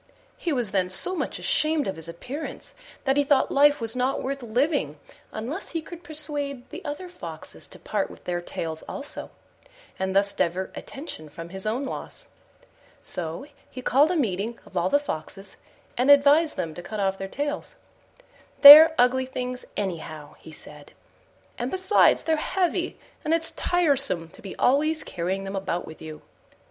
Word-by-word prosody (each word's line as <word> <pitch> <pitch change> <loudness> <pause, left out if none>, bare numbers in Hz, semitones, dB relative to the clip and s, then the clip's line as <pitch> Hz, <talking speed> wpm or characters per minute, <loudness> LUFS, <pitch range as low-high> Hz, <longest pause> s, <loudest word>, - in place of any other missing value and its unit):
He 340 - -3
was 245 -8 -1
then 185 -2 +1
so 190 - +1
much - - -3
ashamed 310 -2 0
of 190 - -2
his 160 +1 -8
appearance 255 - -7 0.3
that 270 0 +1
he 285 - +4
thought 280 -1 +2
life 290 +1 +5
was 225 0 -1
not 255 +2 0
worth 275 +1 -3
living 240 - 0 0.3
unless 265 - -5
he 330 - -1
could 345 +1 -10
persuade 290 -5 -5
the - - -8
other 295 +6 -5
Foxes 355 - -8
to - - -9
part - - -2
with - - -14
their 175 -1 -2
tails 160 -2 -5
also, 285 - -6 0.7
and 190 0 -2
thus 200 0 +3
divert 185 +1 -1
attention 270 - -8
from 165 +3 -9
his 190 +3 -6
own 245 +6 -1
loss. - - -7 0.7
So 165 - -5 0.2
he 255 - -9
called 285 +6 +4
a 360 - 0
meeting 225 - -1
of - - -17
all 180 +1 +1
the 285 - +4
Foxes, 195 - -6 0.4
and 255 +3 +2
advised 285 +3 +6
them 160 -2 -3
to 175 - -8
cut 215 +4 -6
off 195 -1 0
their 195 - -4
tails: 290 +7 -4 0.9
"They're 310 +3 +12
ugly 255 +1 +3
things 250 -1 -5
anyhow," 155 -6 -5
he 160 - -13
said, 150 -1 -13 0.7
"and - - -2
besides 375 +2 +4
they're 320 -1 +1
heavy, 360 +1 -1 0.3
and 315 +2 +2
it's 325 0 +1
tiresome 275 - +1
to 190 - -15
be 195 - -8
always 310 +4 +2
carrying 185 +3 -3
them 195 0 -5
about 190 -2 -2
with 160 - -12
you." 155 -1 -9
250 Hz, 170 wpm, -25 LUFS, 185-295 Hz, 0.9 s, They're